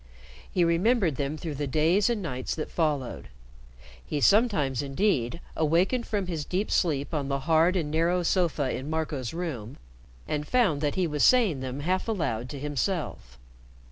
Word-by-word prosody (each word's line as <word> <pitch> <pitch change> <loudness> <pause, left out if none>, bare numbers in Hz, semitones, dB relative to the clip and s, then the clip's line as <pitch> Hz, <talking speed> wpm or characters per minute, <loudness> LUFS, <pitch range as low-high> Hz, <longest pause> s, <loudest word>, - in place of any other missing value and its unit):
He 180 - +2
remembered 170 - +2
them 140 +2 -2
through 155 0 -5
the 145 0 -3
days 160 - +3
and 225 -4 -1
nights 130 -6 -3
that 155 - -5
followed. 150 -6 -1 0.8
He 70 - -3
sometimes, 175 - +3
indeed, 140 - 0 0.2
awakened 175 - +1
from 205 -3 -1
his 165 -4 -3
deep 185 +7 -2
sleep 150 -4 0
on 145 -3 -1
the 140 0 -1
hard 165 +4 +3
and 155 -5 -1
narrow 170 +3 +1
sofa 165 -7 +1
in 135 +3 -5
Marco's 155 -6 -2
room, 145 -10 -5 0.5
and 150 0 -2
found 210 - +2
that 145 -2 0
he 185 - +1
was 150 -3 0
saying 225 - +4
them 130 +1 -5
half 185 +7 -1
aloud 135 - -2
to 145 - -6
himself. 145 - -3
155 Hz, 165 wpm, -27 LUFS, 140-180 Hz, 0.8 s, saying